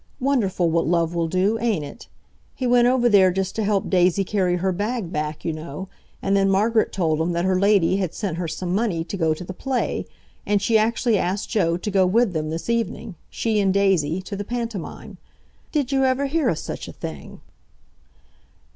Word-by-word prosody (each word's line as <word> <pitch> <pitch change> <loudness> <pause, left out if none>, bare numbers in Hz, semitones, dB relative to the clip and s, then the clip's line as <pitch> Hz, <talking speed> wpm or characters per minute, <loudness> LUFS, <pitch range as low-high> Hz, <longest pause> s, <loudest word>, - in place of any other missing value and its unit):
Wonderful 230 -10 +1
what 165 -1 +1
love 170 0 +1
will 170 -1 0
do, 190 +6 +1
ain't 210 -11 0
it? 140 - -11 0.5
He 260 - -3
went 245 0 +4
over 250 -1 +3
there 200 -4 +6
just 190 +1 -2
to 220 - -1
help 200 -2 0
Daisy 185 +1 +3
carry 185 -2 0
her 190 +2 0
bag 205 0 -3
back, 150 0 -3
you 165 - -1
know, 155 +4 -7 0.3
and 195 - +2
then 195 0 +3
Margaret 220 +3 +2
told 160 -4 0
him 170 +2 0
that 170 +1 0
her 185 -1 +2
lady 195 -2 +3
had 185 -4 -2
sent 190 -6 -3
her 175 -1 -2
some 175 +3 -3
money 195 -6 0
to 180 - -6
go 160 -4 +1
to 170 - -8
the 185 - -7
play, 260 +6 -2 0.4
and 205 0 +1
she 220 +3 0
actually 225 0 +2
asked 190 +4 -2
Joe 170 -6 +1
to 210 +4 -4
go 190 -1 +3
with 220 +1 +2
them 155 -1 -2
this 165 +1 -5
evening—she 225 -1 -2
and 195 -2 +2
Daisy—to 190 -1 +1
the 205 - -4
pantomime. 230 -4 -6 0.5
Did 285 -4 -1
you 270 -1 +2
ever 260 +1 +2
hear 285 -2 +1
o' - - +1
such - - -6
a - - -9
thing?" 75 -4 -8
195 Hz, 200 wpm, -23 LUFS, 170-225 Hz, 0.5 s, there